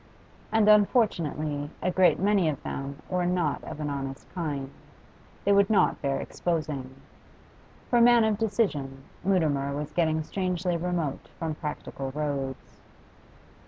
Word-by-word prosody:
And 220 Hz, -1 st, +3 dB
unfortunately 165 Hz, -, +2 dB
a 185 Hz, -, 0 dB
great 180 Hz, -3 st, +4 dB
many 195 Hz, -3 st, +3 dB
of 145 Hz, -, -4 dB
them 140 Hz, +1 st, -5 dB
were 180 Hz, -1 st, 0 dB
not 175 Hz, -4 st, 0 dB
of -, -, -7 dB
an 150 Hz, -1 st, -2 dB
honest 135 Hz, -1 st, -5 dB
kind; 145 Hz, -6 st, -3 dB, 0.7 s
they 200 Hz, -, +4 dB
would 200 Hz, 0 st, +5 dB
not 215 Hz, -, +3 dB
bear 140 Hz, -1 st, 0 dB
exposing. 150 Hz, -6 st, -3 dB, 0.9 s
For 240 Hz, -, +3 dB
a -, -, +5 dB
man 240 Hz, -1 st, +7 dB
of 220 Hz, -1 st, +1 dB
decision, 155 Hz, -, -1 dB, 0.2 s
Mutimer 150 Hz, -7 st, +1 dB
was 150 Hz, 0 st, -5 dB
getting 160 Hz, -2 st, +1 dB
strangely 180 Hz, 0 st, -1 dB
remote 170 Hz, -4 st, -2 dB
from 165 Hz, -2 st, -2 dB
practical 150 Hz, -3 st, -5 dB
roads. 140 Hz, -3 st, -4 dB
160 Hz, 135 wpm, -27 LUFS, 145-190 Hz, 0.9 s, man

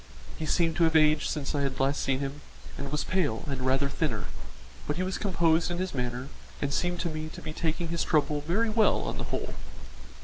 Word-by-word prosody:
He 155 Hz, -, -4 dB
seemed 165 Hz, -1 st, +2 dB
to 170 Hz, -, +4 dB
have 160 Hz, 0 st, +2 dB
aged 155 Hz, -1 st, +5 dB
since 145 Hz, -1 st, -2 dB
I 145 Hz, -, 0 dB
had 135 Hz, -2 st, -1 dB
last 135 Hz, +2 st, +2 dB
seen 135 Hz, 0 st, +1 dB
him, 140 Hz, +1 st, -4 dB, 0.3 s
and 140 Hz, 0 st, -5 dB
was 150 Hz, -, 0 dB
pale 160 Hz, -12 st, 0 dB
and 135 Hz, -2 st, -3 dB
rather 135 Hz, +2 st, +3 dB
thinner, 140 Hz, -7 st, -1 dB, 0.6 s
but 150 Hz, -, 0 dB
he 180 Hz, -, 0 dB
was 185 Hz, 0 st, -2 dB
composed 170 Hz, -4 st, +3 dB
in 175 Hz, -, -2 dB
his 185 Hz, 0 st, -2 dB
manner 125 Hz, 0 st, -2 dB, 0.3 s
and 140 Hz, -1 st, -1 dB
seemed 175 Hz, +2 st, 0 dB
to 170 Hz, -, -1 dB
me 155 Hz, 0 st, -4 dB
to -, -, -9 dB
be 155 Hz, -, -6 dB
taking 165 Hz, +1 st, -1 dB
his 170 Hz, 0 st, 0 dB
trouble 150 Hz, -1 st, +2 dB
very 205 Hz, +9 st, +1 dB
well 215 Hz, -1 st, +4 dB
on -, -, -3 dB
the -, -, -3 dB
whole. -, -, -3 dB
155 Hz, 225 wpm, -29 LUFS, 140-170 Hz, 0.6 s, aged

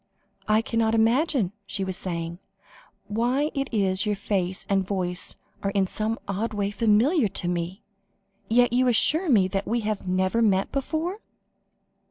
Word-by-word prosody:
"I 215 Hz, +1 st, +3 dB
cannot 225 Hz, -1 st, +1 dB
imagine," 230 Hz, -, +2 dB, 0.2 s
she 195 Hz, -, -2 dB
was 190 Hz, -1 st, -3 dB
saying, 170 Hz, -2 st, -4 dB, 0.7 s
"why 245 Hz, +8 st, 0 dB
it 275 Hz, -1 st, -1 dB
is 195 Hz, -4 st, +1 dB
that -, -, +2 dB
your 210 Hz, -, +1 dB
face 190 Hz, -2 st, -2 dB
and 195 Hz, -1 st, +2 dB
voice 180 Hz, -2 st, -3 dB, 0.3 s
are 195 Hz, -, 0 dB
in 195 Hz, -1 st, +1 dB
some 215 Hz, +4 st, -1 dB
odd 210 Hz, +3 st, -2 dB
way 200 Hz, -1 st, -1 dB
familiar 230 Hz, -, +3 dB
to 180 Hz, -, -4 dB
me, 175 Hz, +2 st, -3 dB, 0.7 s
and 225 Hz, -, +1 dB
yet 245 Hz, -1 st, +5 dB
you 255 Hz, +1 st, +3 dB
assure 310 Hz, +9 st, +2 dB
me 205 Hz, -8 st, +5 dB, 0.2 s
we 235 Hz, +1 st, -1 dB
have 210 Hz, -3 st, -3 dB
never 185 Hz, +5 st, +1 dB
met 195 Hz, -3 st, +2 dB
before?" 320 Hz, +8 st, -2 dB
210 Hz, 160 wpm, -25 LUFS, 190-240 Hz, 0.7 s, yet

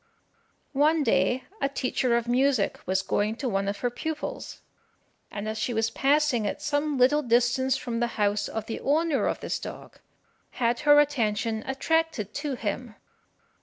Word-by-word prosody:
One 300 Hz, +3 st, +3 dB
day 230 Hz, +2 st, +2 dB, 0.2 s
a 275 Hz, -, +1 dB
teacher 255 Hz, -2 st, 0 dB
of 235 Hz, 0 st, -3 dB
music 250 Hz, -3 st, +2 dB
was 190 Hz, +1 st, +1 dB
going 210 Hz, +3 st, 0 dB
to 260 Hz, +2 st, -4 dB
one 195 Hz, -3 st, 0 dB
of 200 Hz, 0 st, -3 dB
her 245 Hz, -, 0 dB
pupils, 310 Hz, +5 st, -5 dB, 0.7 s
and 205 Hz, +1 st, -5 dB
as 220 Hz, 0 st, -3 dB
she 240 Hz, -, -1 dB
was 225 Hz, 0 st, +1 dB
passing 275 Hz, -5 st, +2 dB
at -, -, -3 dB
some 295 Hz, 0 st, -1 dB
little 265 Hz, +4 st, +4 dB
distance 250 Hz, +1 st, +2 dB
from 235 Hz, -3 st, -4 dB
the 240 Hz, -, +1 dB
house 205 Hz, -1 st, +1 dB
of 220 Hz, -1 st, -4 dB
the 225 Hz, -, -5 dB
owner 305 Hz, +1 st, +1 dB
of -, -, -2 dB
this -, -, -2 dB
dog, -, -, -9 dB, 0.5 s
had 235 Hz, -1 st, 0 dB
her 290 Hz, 0 st, +9 dB
attention 225 Hz, -6 st, 0 dB
attracted 270 Hz, -5 st, 0 dB
to 290 Hz, -2 st, -3 dB
him. 230 Hz, 0 st, -4 dB
245 Hz, 165 wpm, -26 LUFS, 220-290 Hz, 0.7 s, her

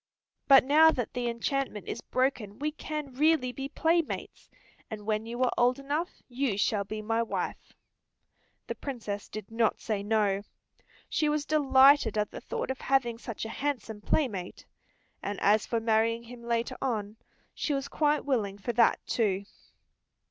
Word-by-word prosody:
But 275 Hz, -1 st, +8 dB
now 305 Hz, +4 st, +6 dB
that 250 Hz, -7 st, -2 dB
the 245 Hz, -1 st, -1 dB
enchantment 235 Hz, -2 st, -2 dB
is -, -, -4 dB
broken 255 Hz, -6 st, -1 dB
we 300 Hz, +2 st, -1 dB
can 300 Hz, -2 st, -5 dB
really 295 Hz, -2 st, +3 dB
be 270 Hz, +2 st, -5 dB
playmates, 330 Hz, +2 st, -1 dB, 0.4 s
and 210 Hz, -3 st, -7 dB
when 215 Hz, +1 st, -1 dB
you 240 Hz, +2 st, -2 dB
are 250 Hz, -, +2 dB
old 245 Hz, +1 st, +4 dB
enough 290 Hz, +5 st, -3 dB
you 245 Hz, -4 st, -1 dB
shall 205 Hz, 0 st, +1 dB
be 215 Hz, +2 st, -6 dB
my 225 Hz, +2 st, +1 dB
wife." 230 Hz, -, -4 dB, 0.9 s
The -, -, -3 dB
Princess 215 Hz, -7 st, -5 dB
did 215 Hz, 0 st, -8 dB
not 225 Hz, -1 st, +1 dB
say 215 Hz, -3 st, -2 dB
no. 205 Hz, -2 st, +1 dB, 0.7 s
She 305 Hz, -, +1 dB
was 300 Hz, -1 st, 0 dB
delighted 275 Hz, -6 st, +5 dB
at 210 Hz, -1 st, 0 dB
the -, -, -8 dB
thought -, -, -3 dB
of 265 Hz, -, -6 dB
having 240 Hz, -4 st, +1 dB
such 230 Hz, -2 st, -6 dB
a -, -, -5 dB
handsome 230 Hz, -5 st, -3 dB
playmate. 205 Hz, -, -1 dB, 0.6 s
And 200 Hz, 0 st, -4 dB
as 210 Hz, +1 st, +3 dB
for 230 Hz, -, 0 dB
marrying 225 Hz, +1 st, +1 dB
him 240 Hz, 0 st, -11 dB
later 235 Hz, 0 st, -1 dB
on, 215 Hz, -5 st, -2 dB, 0.4 s
she 295 Hz, -, -1 dB
was 275 Hz, 0 st, -3 dB
quite 300 Hz, -1 st, +1 dB
willing 215 Hz, -8 st, 0 dB
for 235 Hz, +4 st, -3 dB
that, 230 Hz, 0 st, +4 dB
too. 200 Hz, -4 st, 0 dB
235 Hz, 165 wpm, -29 LUFS, 215-275 Hz, 0.9 s, But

